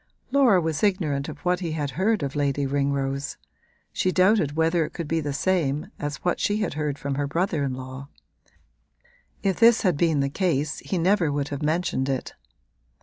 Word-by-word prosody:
Laura 255 -9 +5
was 160 -3 -2
ignorant 160 -9 0
of - - -7
what 180 0 +2
he 170 -4 -3
had 145 -3 -2
heard 195 - +1
of 140 0 -3
Lady 140 -1 0
Ringrose; 140 0 -1 0.6
she 185 - +1
doubted 185 -5 +3
whether 165 +1 +2
it - - -6
could 170 -3 -5
be 165 +2 0
the 145 -2 -3
same 150 -2 0
as 145 0 -3
what 175 - +1
she 205 - +1
had 215 -4 -1
heard 150 -2 -2
from 140 0 -3
her 145 - -1
brother 165 0 0
in 135 -2 -2
law: 130 +1 -8 1.4
if 195 -2 0
this 230 -1 +6
had 180 -7 +2
been 160 -2 +2
the 140 - +2
case 155 -2 -1
he 190 - -3
never 175 -2 +2
would 145 0 -2
have 145 0 -5
mentioned 155 -3 0
it. 130 -2 -3
155 Hz, 190 wpm, -25 LUFS, 140-185 Hz, 1.4 s, this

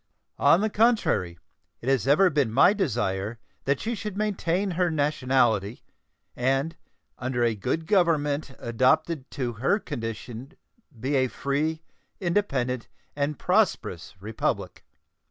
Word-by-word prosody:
On 165 +6 +5
the 215 - +1
contrary, 210 - +2 0.4
it 120 - -9
has 135 -2 +2
ever 175 +7 +5
been 140 -6 +1
my 140 - +6
desire 110 - -1 0.3
that 140 0 +1
she 230 - -2
should 210 -3 -5
maintain 200 -2 0
her 180 0 +1
nationality, 130 -8 +1 0.5
and 135 +6 0 0.4
under 125 -1 -1
a 115 -1 +2
good 160 +10 -2
government 155 -7 +1
adapted 130 +5 +1
to 125 -5 -3
her 130 - +1
condition 120 - -6 0.5
be 135 +5 -2
a 130 -1 +3
free, 155 +5 -2 0.4
independent, 140 - -1 0.3
and 145 0 -1
prosperous 180 - 0
Republic. 105 +3 -3
140 Hz, 120 wpm, -26 LUFS, 120-170 Hz, 0.5 s, my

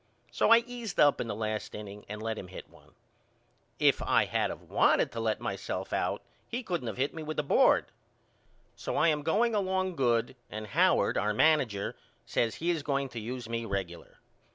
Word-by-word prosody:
So - - +2
I 230 0 +8
eased 240 -5 -6
up 145 -1 +5
in 120 - -3
the 105 - -3
last 110 0 -3
inning 105 -1 -9
and 105 +1 -6
let 110 0 -2
him 95 - -7
hit 90 - -10
one. - - -21 0.8
If - - +3
I - - +3
had - - 0
of - - -8
wanted - - +3
to 115 - -5
let 110 -1 0
myself - - -4
out - - -1 0.2
he 245 +2 -4
couldn't 175 - -3
of - - -4
hit 135 +3 0
me 160 - -6
with 155 0 -5
a 150 - +1
board. 145 - +4 0.9
So - - -4
I 165 - +4
am 150 -1 +1
going 220 +10 +2
along 190 -2 0
good 120 -2 +1
and 110 +1 -6
Howard 105 - +3
our 105 0 0
manager 125 -9 +2 0.3
says 115 -1 0
he 170 +2 0
is 165 -3 -1
going 140 -1 -1
to 120 - -6
use 120 +2 -5
me 115 0 -3
regular. 95 -5 -5
130 Hz, 200 wpm, -30 LUFS, 110-165 Hz, 0.9 s, I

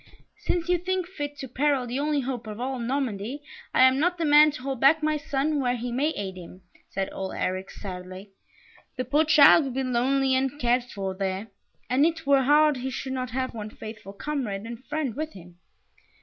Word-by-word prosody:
"Since 345 -1 -1
you 355 -1 +2
think 370 +1 -1
fit 290 -6 -6
to 270 - -6
peril 270 +1 +1
the 245 +3 -3
only 295 0 +1
hope 245 -3 -4
of 215 +1 -7
all 260 +1 -3
Normandy, 245 +1 -3 0.3
I - - +5
am 260 +1 +5
not 355 +3 +1
the 335 - -1
man 300 +1 +7
to 290 -2 -7
hold 270 -2 -3
back 310 +5 +5
my 310 0 +2
son 290 0 -1
where 250 -2 +1
he 240 +1 -4
may 275 +6 +1
aid 190 -2 -5
him," 180 +1 -11 0.3
said 195 -1 -2
old 190 0 -5
Eric, 185 +1 -2
sadly. 185 0 -8 0.6
"The 255 - -3
poor 295 +5 +2
child 310 +1 +7
will 270 - -3
be 265 +1 -1
lonely 260 +2 +1
and 265 0 +1
uncared 245 -3 +1
for 195 -5 -4
there, 190 +2 -3 0.4
and 255 +3 +2
it 325 0 0
were 275 -1 +5
hard 295 +2 +4
he 255 +1 -3
should 265 0 -4
not 255 -1 -3
have 255 +2 -2
one 215 -2 -6
faithful 215 -2 -10
comrade 225 -5 -3
and 235 +2 -8
friend 300 -6 -2
with 310 +2 -4
him." 175 -1 -14
260 Hz, 205 wpm, -26 LUFS, 225-295 Hz, 0.6 s, man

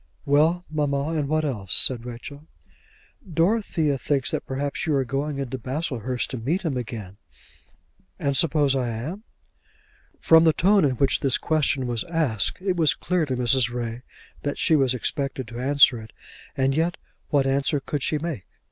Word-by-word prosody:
"Well, 160 +5 +2
mamma; 145 -1 -1
and 155 -3 -1
what 155 0 +1
else?" 105 -10 -3
said 125 -2 +3
Rachel. 140 +5 -9 0.8
"Dorothea 165 - +1
thinks 135 0 -1
that - - -3
perhaps 140 +3 -3
you 155 - +2
are 135 -1 +1
going 140 +3 -2
into 130 -1 -4
Baslehurst 130 -2 -3
to 130 - -4
meet 155 +12 -1
him 155 -6 -1
again." 110 -5 -6 1.0
"And 140 -1 -1
suppose 145 -3 +3
I 125 -2 -1
am?" 150 - -5 0.9
From 160 0 +6
the 160 -1 +5
tone 195 +2 +4
in 130 -2 +1
which 135 +1 +1
this 135 -2 +1
question 150 -4 0
was 120 -2 -2
asked 155 - 0
it 185 -2 0
was 155 -4 +3
clear 180 -4 -1
to 130 -2 -2
Mrs. 125 0 +2
Ray 120 -1 -4 0.4
that 145 - -3
she 160 - +3
was 135 -3 +2
expected 135 -1 -3
to 120 0 -7
answer 135 -2 +4
it. 110 - -13 0.4
And 135 0 +2
yet 165 +4 0 0.3
what 140 -3 +2
answer 140 +2 +1
could 145 +1 -4
she 155 - +1
make? 150 - -5
140 Hz, 170 wpm, -24 LUFS, 125-155 Hz, 1.0 s, From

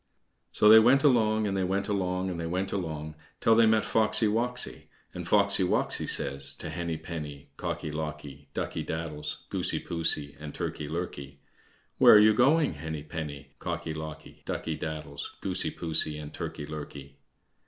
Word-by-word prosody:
So 105 - +3
they 110 +1 +10
went 125 +5 +5
along, 110 -6 +3
and 100 -1 -1
they 95 - 0
went 95 +2 0
along, 95 -2 -1
and 85 - -5
they 85 - -3
went 95 +3 -1
along 80 -5 -4 0.3
till 115 - +4
they 115 0 +6
met 110 -1 +3
Foxy 110 0 +3
woxy, 120 +3 -1 0.3
and - - -6
Foxy - - +4
woxy - - +1
says 70 0 -1
to - - -6
Henny 85 -2 -3
penny, 75 -3 -7
Cocky 75 - -4
locky, 75 -2 -6
Ducky - - -2
daddles, 75 -2 -5
Goosey - - -1
poosey, 80 -4 -1
and 75 -1 -8
Turkey 75 - -4
lurkey: 70 -4 -5 0.6
"Where - - +9
are - - +10
you 105 +1 +7
going, 140 - +4
Henny 80 -2 -4
penny, 75 -2 -6
Cocky 80 - -3
locky, 80 -1 -8
Ducky 80 - -3
daddles, 75 -2 -6
Goosey 95 -1 -1
poosey, 80 -2 -1
and 75 0 -8
Turkey 75 - -5
lurkey?" 70 -2 -8
80 Hz, 165 wpm, -28 LUFS, 75-105 Hz, 0.6 s, they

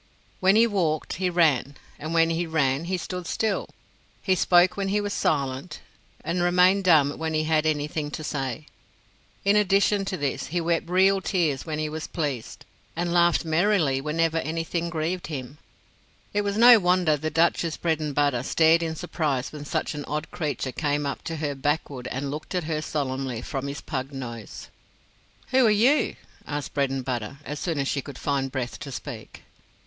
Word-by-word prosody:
When 190 +1 +4
he 225 +2 +6
walked 175 -8 -1
he 185 -1 0
ran, 150 -6 +2 0.2
and 155 +2 -5
when 165 0 +3
he 165 +1 -1
ran 145 -2 +1
he 185 +1 -1
stood 180 0 -5
still. 220 -3 -1 0.5
He 190 - +3
spoke 180 0 +4
when 200 -1 -2
he 205 +2 +1
was 205 -1 -2
silent 140 +2 -1 0.4
and 170 +2 -1
remained 180 +2 +4
dumb 150 -5 +4
when 160 0 -2
he 155 - +1
had 155 0 +2
anything 150 0 -1
to 155 - -6
say. 135 -1 -3 0.8
In 200 +1 +4
addition 200 0 +3
to 190 - -3
this, 145 -2 -2
he 175 +3 -1
wept 170 0 0
real 190 +2 +4
tears 165 -7 0
when 155 -1 -2
he 155 0 -1
was 155 +1 -5
pleased, 145 -8 -4 0.3
and 170 0 -1
laughed 175 0 +3
merrily 160 -4 +2
whenever 165 +2 0
anything 165 +1 -2
grieved 170 +2 -2
him. 140 -1 -6 0.7
It 205 - +2
was 200 0 -2
no 235 0 +9
wonder 180 -4 +3
the 155 +2 -3
Duchess 165 +1 +1
Bredenbutta 145 -5 0
stared 160 +3 +4
in 160 -1 -2
surprise 150 -6 -2
when 150 -1 -8
such - - -2
an 145 -1 -5
odd 150 +2 -4
creature 145 -5 -3
came 145 +1 -1
up 140 - -3
to 165 - -3
her 150 -2 -2
backward 140 -2 -2
and 135 +2 -3
looked 155 +5 -6
at 180 - 0
her 155 0 -2
solemnly 130 -5 -3
from 135 -1 -4
his 140 +1 -5
pug 135 0 -4
nose. 120 -5 -8 0.8
"Who 260 0 +4
are - - +5
you?" 235 +8 +3 0.3
asked 145 -2 -4
Bredenbutta, 135 -3 -2
as 150 0 -5
soon 165 -4 -2
as 140 -1 0
she 140 - -1
could 140 -1 -10
find 135 -2 -1
breath 130 -2 -4
to 140 - -7
speak. 125 -3 -8
155 Hz, 180 wpm, -25 LUFS, 140-175 Hz, 0.8 s, no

